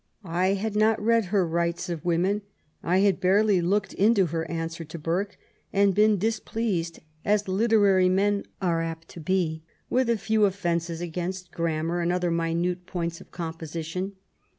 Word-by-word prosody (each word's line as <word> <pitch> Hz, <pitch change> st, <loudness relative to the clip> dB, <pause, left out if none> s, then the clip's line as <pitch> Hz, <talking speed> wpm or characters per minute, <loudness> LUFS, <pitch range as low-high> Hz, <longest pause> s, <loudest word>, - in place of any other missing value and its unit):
I 185 Hz, +2 st, +1 dB
had 210 Hz, +2 st, -3 dB
not 215 Hz, +1 st, +3 dB
read 230 Hz, 0 st, +2 dB
her 190 Hz, 0 st, +1 dB
Rights 170 Hz, +2 st, -1 dB
of 170 Hz, -4 st, -4 dB
Women, 180 Hz, +4 st, +1 dB, 0.4 s
I 185 Hz, +3 st, +2 dB
had 195 Hz, -3 st, +3 dB
barely 195 Hz, 0 st, +4 dB
looked 195 Hz, +4 st, 0 dB
into 205 Hz, -1 st, +4 dB
her 165 Hz, 0 st, -3 dB
answer 165 Hz, 0 st, -4 dB
to 160 Hz, +1 st, -8 dB
Burke, 175 Hz, +6 st, -2 dB, 0.3 s
and 200 Hz, 0 st, +3 dB
been 210 Hz, +1 st, +4 dB
displeased, 215 Hz, -4 st, -2 dB, 0.2 s
as 210 Hz, 0 st, +1 dB
literary 195 Hz, -2 st, +4 dB
men 200 Hz, +2 st, +1 dB, 0.2 s
are 170 Hz, -2 st, +1 dB
apt 165 Hz, 0 st, -5 dB
to -, -, -10 dB
be 160 Hz, -1 st, 0 dB, 0.3 s
with 255 Hz, -1 st, +2 dB
a 235 Hz, -, +3 dB
few 220 Hz, 0 st, +2 dB
offences 170 Hz, -3 st, -1 dB
against 180 Hz, +2 st, -4 dB
grammar 165 Hz, +1 st, -1 dB
and 170 Hz, +1 st, +1 dB
other 180 Hz, -1 st, 0 dB
minute 170 Hz, +2 st, -1 dB
points 170 Hz, -2 st, -3 dB
of -, -, -15 dB
composition. 165 Hz, +2 st, -5 dB
180 Hz, 160 wpm, -26 LUFS, 170-200 Hz, 0.4 s, barely